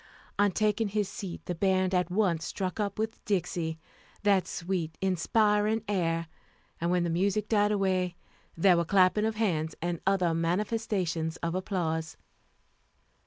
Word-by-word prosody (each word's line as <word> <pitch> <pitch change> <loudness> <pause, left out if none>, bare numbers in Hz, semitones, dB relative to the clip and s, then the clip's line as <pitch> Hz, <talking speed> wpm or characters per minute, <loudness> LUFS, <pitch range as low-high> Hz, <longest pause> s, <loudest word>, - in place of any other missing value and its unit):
On 205 -1 +4
taking 215 +2 +1
his 205 0 -1
seat 190 -2 -7
the 180 - -2
band 185 +1 +1
at 180 -1 +1
once 180 -4 +1
struck 190 +1 -3
up 200 -2 -1
with 220 +1 -3
Dixie, 180 -5 -1 0.5
that 200 -3 +3
sweet, 170 -3 -3
inspiring 210 +4 +2
air; 165 -4 0 0.5
and 170 - 0
when 180 -1 +2
the 170 - 0
music 195 +4 +1
died 205 -1 +3
away, 185 -3 +1 0.4
there 180 +1 +5
were 170 - +2
clapping 190 +3 +3
of 220 0 -1
hands 160 -8 0
and 170 0 -3
other 185 -4 +3
manifestations 175 -2 -1
of 170 0 -1
applause. 165 -4 -2
185 Hz, 145 wpm, -29 LUFS, 170-205 Hz, 0.5 s, there